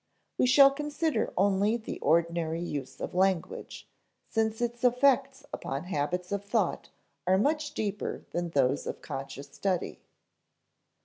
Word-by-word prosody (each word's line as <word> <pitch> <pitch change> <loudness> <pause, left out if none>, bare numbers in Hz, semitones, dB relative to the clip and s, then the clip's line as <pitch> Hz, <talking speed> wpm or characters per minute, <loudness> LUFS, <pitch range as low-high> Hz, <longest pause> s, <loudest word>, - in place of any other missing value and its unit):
We - - +4
shall 275 +2 +8
consider 295 +2 -1
only 200 +3 +3
the 220 - -7
ordinary 165 0 +1
use 145 -6 -5
of - - -5
language, 185 -1 -1 0.4
since 220 -1 0
its 240 0 -2
effects 270 +2 +3
upon 135 +3 -4
habits 180 +2 -2
of 200 0 -1
thought 205 -3 -1 0.4
are 190 +1 +5
much 295 +6 0
deeper 205 -1 -3
than 175 0 -2
those 140 -3 +1
of - - -5
conscious 140 +1 -6
study. 185 -3 -2
200 Hz, 130 wpm, -29 LUFS, 170-250 Hz, 0.4 s, shall